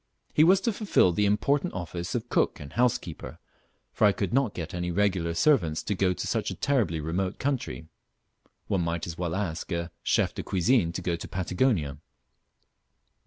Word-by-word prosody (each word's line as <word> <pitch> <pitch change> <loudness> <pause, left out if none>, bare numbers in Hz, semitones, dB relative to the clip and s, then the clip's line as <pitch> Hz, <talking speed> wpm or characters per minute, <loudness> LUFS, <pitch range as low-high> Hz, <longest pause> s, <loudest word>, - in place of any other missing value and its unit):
He 150 - +5
was 185 +3 +6
to 230 +2 0
fulfil 200 - +3
the 100 +4 +1
important 140 - +1
office 85 0 -4
of 120 0 -2
cook - - +1
and 70 -1 -9
housekeeper, 125 0 -1 0.6
for - - +3
I - - +5
could 100 -2 -3
not 135 -5 +1
get 80 -3 -5
any 90 0 -2
regular 90 -3 0
servants 85 - +2
to - - -1
go 95 -1 +2
to 90 - -3
such - - -1
a - - -5
terribly 115 - +1
remote 90 +5 -2
country; 135 - -2 0.8
one 95 - 0
might 85 -1 -2
as 85 0 -7
well 85 -1 -2
ask 95 -3 -3
a 85 0 -2
chef - - +1
de - - -4
cuisine 95 0 +2
to 90 - -5
go 85 -1 0
to 85 - -7
Patagonia. 90 - 0
90 Hz, 180 wpm, -27 LUFS, 85-120 Hz, 0.8 s, was